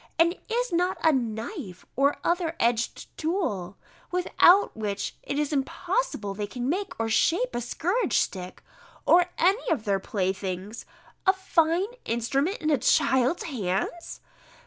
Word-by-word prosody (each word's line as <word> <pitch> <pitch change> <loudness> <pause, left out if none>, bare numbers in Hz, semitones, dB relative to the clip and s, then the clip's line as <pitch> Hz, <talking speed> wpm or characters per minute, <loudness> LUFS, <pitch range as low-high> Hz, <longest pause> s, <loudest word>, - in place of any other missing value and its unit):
and 335 +2 +4
is 485 -2 -1
not 360 +2 +1
a 320 - +6
knife, 225 - -4
or 280 +2 +2
other 345 -2 0
edged 235 0 -1
tool, 305 - -2 0.3
without 360 +2 +4
which 205 -2 -3
it 280 - -4
is 300 0 0
impossible 275 - -1
they 205 +1 -4
can 245 +3 -4
make 380 - -2
or 225 - 0
shape 340 - +2
a - - -2
scourge 360 - 0
stick, 185 -1 -3 0.4
or 350 0 +5
any 385 +7 +2
of 275 -10 0
their 200 -2 +1
playthings, 190 +1 -3 0.4
a 380 - +7
fine 350 -2 +2 0.2
instrument 270 - 0
in 310 - -1
a 285 - +3
child's 265 +2 +3
hands! 235 - -3
280 Hz, 140 wpm, -26 LUFS, 215-350 Hz, 0.4 s, a